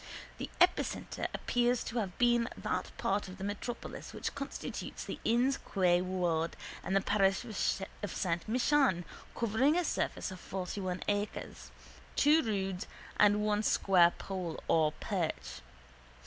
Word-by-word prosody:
The - - -4
epicentre - - +2
appears 245 0 +1
to 235 - -2
have 190 -5 -3
been 240 -1 +3
that - - -2
part 200 +1 0
of 185 - -9
the - - -7
metropolis 205 +4 -5
which - - -3
constitutes 280 0 -5
the - - -5
Inn's 245 +4 +2
Quay 180 -3 +2
ward 175 -3 0 0.3
and 195 0 +1
parish 195 +2 +2 0.6
of 205 - -3
Saint 170 -1 -1
Michan 250 - +3 0.3
covering 240 +7 +2
a 355 - +2
surface - - -1
of 185 - -8
fortyone 185 0 -4
acres, 205 0 -3 0.5
two 300 +3 +5
roods 195 - -2 0.3
and 210 0 +5
one 210 0 +2
square 185 -5 +5
pole 180 -4 -4
or 155 -2 +4
perch. - - -3
205 Hz, 135 wpm, -32 LUFS, 185-240 Hz, 0.6 s, two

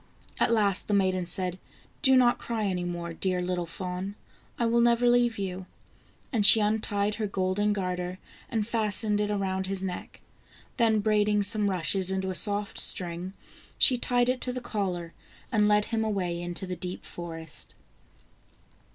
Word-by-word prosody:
At - - +2
last 205 -4 +1
the 205 - +1
maiden 185 -2 +1
said: 180 +1 -1 0.2
" - - -31
Do 265 -2 +5
not 245 -1 +4
cry 225 -3 -3
any 180 -2 -2
more, 170 -1 -5
dear 185 +1 -1
little 180 -1 -2
fawn, 180 +3 -5 0.4
I 235 - 0
will 235 +1 +2
never 235 +1 +3
leave 240 -1 +3
you," 190 -2 -5 0.7
and 220 -3 +1
she 220 - +9
untied 210 -1 0
her 215 - 0
golden 195 +2 0
garter 180 -2 -3 0.3
and 225 -5 -1
fastened 215 -2 0
it 210 - -1
around 190 -2 -2
his 195 0 -2
neck, 180 -2 -6 0.6
then 225 -3 +2
braiding 210 -1 +2
some 205 0 +3
rushes 185 +1 +1
into 190 0 -1
a - - -4
soft 205 +2 0
string, 180 +1 +4 0.4
she 255 - +5
tied 245 0 0
it 255 0 -1
to 250 - +3
the 250 - -4
collar, 190 -8 -4 0.4
and 210 -3 +3
led 210 0 +3
him 225 -1 -2
away 185 -5 -2
into 175 +2 -4
the 180 -1 -5
deep 180 +1 -7
forest. 165 -2 -8
200 Hz, 170 wpm, -27 LUFS, 180-220 Hz, 0.7 s, she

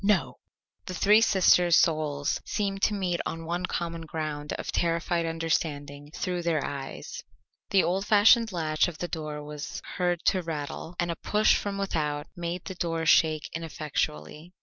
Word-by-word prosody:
"No." 205 0 +1 0.5
The 185 - -4
three 210 +4 +5
sisters' 180 -5 +5
souls 155 -4 +1
seemed 195 -2 -2
to 210 - +2
meet 180 -3 -1
on 165 0 -5
one 175 +2 -2
common 170 -1 -3
ground 150 -2 -4
of - - -4
terrified 170 0 0
understanding 150 -3 -2
through 180 -1 -2
their 165 -4 0
eyes. 140 -1 -6 0.5
The 195 -2 +4
old 190 +3 -1
fashioned 220 +2 +6
latch 155 -3 +1
of 170 -3 -7
the 175 - -3
door 155 -3 -5
was 150 0 -6 0.2
heard 175 -1 0
to 185 - +3
rattle, 160 +1 -5
and 175 0 0
a - - -3
push 215 +1 +3
from 200 -1 -3
without 150 -7 -1
made 175 0 -4
the 190 - -5
door 165 -2 -2
shake 155 -1 +4
ineffectually. 155 - -4
170 Hz, 160 wpm, -27 LUFS, 155-180 Hz, 0.5 s, fashioned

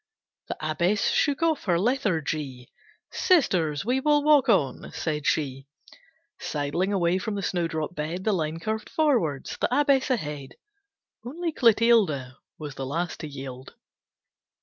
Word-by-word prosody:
The - - -4
Abbess 170 +6 +1
shook 290 +1 +1
off 320 -3 +1
her 175 -4 +2
lethargy. 155 - -1 0.4
"Sisters, 180 - +2
we 250 +3 +1
will 295 +1 +3
walk 295 -4 +5
on," 145 - +1
said 150 -3 -3
she. 135 -2 -1 0.7
Sidling 150 +6 -2
away 180 -2 +1
from 210 +2 -3
the 200 - -3
snowdrop 165 -3 -2
bed, 165 +4 -4
The 215 - +1
line 160 -2 -2
curved 220 +5 -3
forwards, 235 - 0
the - - +2
Abbess 280 0 +3
ahead. 150 - -3 0.7
Only 330 +7 -3
Clotilde 220 - +3 0.2
Was 150 -2 -7
the 135 0 -5
last 165 +5 -3
to 155 - -5
yield. 135 -2 -9
175 Hz, 135 wpm, -26 LUFS, 150-240 Hz, 0.7 s, walk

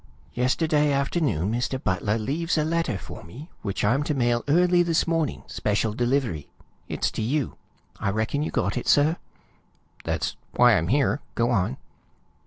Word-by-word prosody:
Yesterday 150 +4 +2
afternoon 140 - 0
Mr. 125 +3 -1
Butler 100 +4 0
leaves 160 +10 -1
a 155 - +2
letter 165 - 0
for - - -10
me, 135 - -11
which 100 0 -2
I'm 125 +7 +3
to 150 - -1
mail 120 -2 +1
early 175 +4 +4
this 170 -2 +2
morning, 165 -3 -1
special 105 +1 -1
delivery. 120 - -1 0.4
It's - - -1
to - - -4
you. 135 +4 -1 0.4
I - - 0
reckon 110 +8 -1
you 155 - -1
got - - -1
it, - - -4
sir?" 155 +4 +4 0.9
"That's - - -2 0.2
why - - +6
I'm 80 - +1
here. 140 +4 +2
Go 120 +1 +1
on." 90 - +1
130 Hz, 160 wpm, -25 LUFS, 110-155 Hz, 0.9 s, why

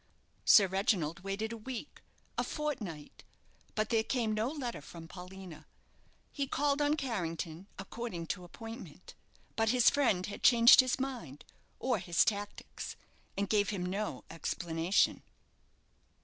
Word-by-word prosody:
Sir 205 - +8
Reginald 190 -4 0
waited 195 +4 -3
a - - -6
week, 250 +4 -7 0.3
a - - 0
fortnight, 220 - -5 0.5
but 215 0 0
there 225 -2 +3
came 230 -2 0
no 215 +3 0
letter 265 - -4
from 165 +3 -10
Paulina. 180 -1 -10 0.6
He 280 -1 -2
called 285 +2 +1
on 290 +1 +3
Carrington, 175 - -3
according 195 -3 -5
to 180 - -11
appointment, 225 +6 -10 0.4
but 225 -1 +2
his 245 0 +5
friend 225 -11 +2
had 205 - -7
changed 235 +1 +8
his 255 0 +4
mind, 240 - -5 0.3
or 250 -5 0
his 175 -2 +3
tactics, 205 -1 -4 0.4
and 200 0 0
gave 205 -1 +2
him 190 -4 -2
no 200 +4 -3
explanation. 165 +2 +1
210 Hz, 135 wpm, -32 LUFS, 180-245 Hz, 0.6 s, Sir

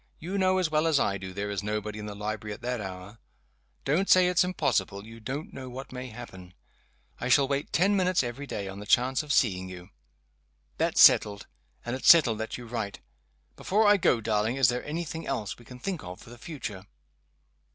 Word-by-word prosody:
You 185 +5 -4
know 185 0 +3
as 180 -4 0
well 155 +1 +2
as 155 -4 +3
I 100 0 0
do 95 0 -7
there 100 +2 -4
is 100 - -2
nobody 105 0 -4
in 105 - -6
the 105 - -7
library 105 0 -4
at - - -17
that 125 -2 -2
hour. 95 +3 -8 0.7
Don't 165 +8 +1
say 185 -1 +7
it's 180 0 +3
impossible 105 - -1
you 115 +1 -12
don't 135 +7 -6
know 130 -1 -7
what 130 +2 -8
may 130 0 -6
happen. 95 -7 -11 0.6
I 120 - -3
shall 140 +1 +5
wait 140 +1 -2
ten 195 +4 +3
minutes 185 -4 +2
every 125 +4 -5
day 100 -6 -4
on 95 +1 -7
the 105 - -9
chance 130 +4 +3
of 150 -1 -6
seeing 95 -9 +2
you. 90 +1 -11 0.9
That's - - 0
settled 100 -1 +6 0.4
and 120 +1 -2
it's 130 - +2
settled 130 -10 +7
that 110 - -4
you 125 - -9
write. 115 -3 -4 0.6
Before 215 +3 +1
I 205 0 +6
go, 125 -10 +2
darling, 110 +2 0
is 135 -4 +4
there 125 0 -2
any 160 +4 -3
thing 160 +1 -7
else 105 0 -3
we 120 - -16
can 125 - -11
think 180 +5 -4
of 90 +2 -8
for 115 - -14
the 120 - -12
future?" 105 - -7
120 Hz, 215 wpm, -28 LUFS, 105-150 Hz, 0.9 s, say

